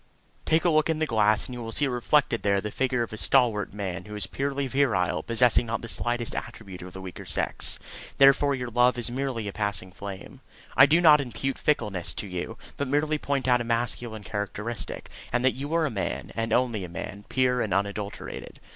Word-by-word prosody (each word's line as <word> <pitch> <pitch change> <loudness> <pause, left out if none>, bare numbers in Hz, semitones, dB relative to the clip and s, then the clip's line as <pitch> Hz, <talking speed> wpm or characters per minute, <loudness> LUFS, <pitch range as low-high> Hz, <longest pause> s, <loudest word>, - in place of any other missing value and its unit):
Take 160 +2 +2
a 175 - +5
look 155 0 +3
in 160 - +1
the 155 - +1
glass, 110 -4 +2
and 125 - -7
you 120 - -6
will 115 -1 -5
see 145 - +1
reflected 125 0 +2
there 100 -1 +2
the 105 +2 -4
figure 125 -1 0
of 115 - -7
a - - -5
stalwart 115 -4 +2
man 95 -4 -4
who 105 0 -8
is 105 -2 0
purely 140 +6 -2
virile, 130 -9 +1
possessing 120 0 +3
not 115 +1 -2
the - - -5
slightest 120 0 -2
attribute 95 -4 -7
of 90 0 -9
the 95 - -8
weaker 95 -1 -8
sex, - - -1 0.4
therefore 140 +1 +6
your 125 -2 -5
love 125 +1 +4
is 120 0 -1
merely 125 -4 -2
a 100 - -5
passing 100 -3 -2
flame. 100 0 -9 0.3
I 135 +3 +8
do 165 +4 +4
not 150 -3 +7
impute 135 +1 -3
fickleness 105 - 0
to - - -4
you, 90 -3 -5 0.2
but 140 - -1
merely 150 +2 +1
point 140 -2 -1
out 125 -1 +4
a - - -1
masculine 115 -2 -1
characteristic, 105 +3 -4 0.2
and 125 +1 +1
that 130 - +4
you 140 +3 -5
are 165 -1 +3
a 150 - -1
man, 100 -4 -3
and 115 0 -2
only 120 -4 +1
a 90 - -6
man, 100 +4 -7
pure 125 -1 +2
and 105 - -2
unadulterated. 100 +1 -3
120 Hz, 210 wpm, -27 LUFS, 105-135 Hz, 0.4 s, I